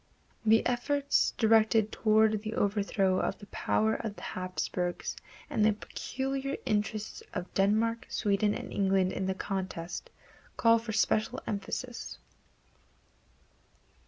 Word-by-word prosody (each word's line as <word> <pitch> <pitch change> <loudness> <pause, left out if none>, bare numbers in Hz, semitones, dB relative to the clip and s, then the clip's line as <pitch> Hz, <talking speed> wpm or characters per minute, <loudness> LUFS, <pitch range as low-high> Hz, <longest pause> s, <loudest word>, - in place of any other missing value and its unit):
The 225 0 +4
efforts 280 +3 +1
directed 220 -1 +4
toward 215 -1 +3
the 215 +1 -4
overthrow 200 -2 +1
of - - -1
the - - -12
power 220 +2 +1
of 220 -3 -4
the - - -11
Hapsburgs 185 -1 -3 0.3
and 215 - 0
the 215 0 +5
peculiar 270 +5 -4
interests 215 0 -1
of 180 0 -4
Denmark, 220 +4 +2
Sweden 205 -1 +1
and - - -6
England 190 -1 +2
in 190 - -2
the 190 - 0
contest 185 -3 -4 0.5
call 230 0 +5
for 225 0 -5
special 215 0 +1
emphasis. 235 +4 -4
215 Hz, 120 wpm, -30 LUFS, 195-225 Hz, 0.5 s, the